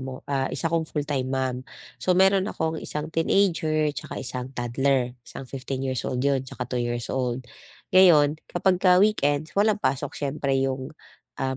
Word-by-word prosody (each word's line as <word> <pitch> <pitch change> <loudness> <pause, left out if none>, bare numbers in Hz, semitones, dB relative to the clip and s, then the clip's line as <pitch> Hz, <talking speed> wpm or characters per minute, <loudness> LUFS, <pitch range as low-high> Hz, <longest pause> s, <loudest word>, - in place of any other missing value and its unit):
mo, 130 0 -6
ah, 135 -1 -1
isa 165 -1 -2
akong 165 -1 0
full-time 145 -3 -2
mom. 130 -1 -1 0.4
So 180 -1 +2
meron 195 +1 +4
akong 160 -4 -2
isang 150 +1 -4
teenager 160 -4 +2
tsaka - - -7
isang 130 +1 -5
toddler. 125 +1 0
Isang 130 - -9
15 135 +1 -5
years 130 -2 -1
old 125 +1 -2
'yon, 135 -2 +1
tsaka 125 - -5
2 125 0 -3
years 120 0 -2
old. 125 -1 -2 0.5
Ngayon, 155 -5 +6
kapagka 180 0 +3
weekend, 155 -7 +2
walang 210 +1 +3
pasok 130 -9 -2
siyempre 140 -1 -1
yung, 130 0 -3 0.5
um, 130 0 -2
140 Hz, 160 wpm, -25 LUFS, 130-165 Hz, 0.5 s, Ngayon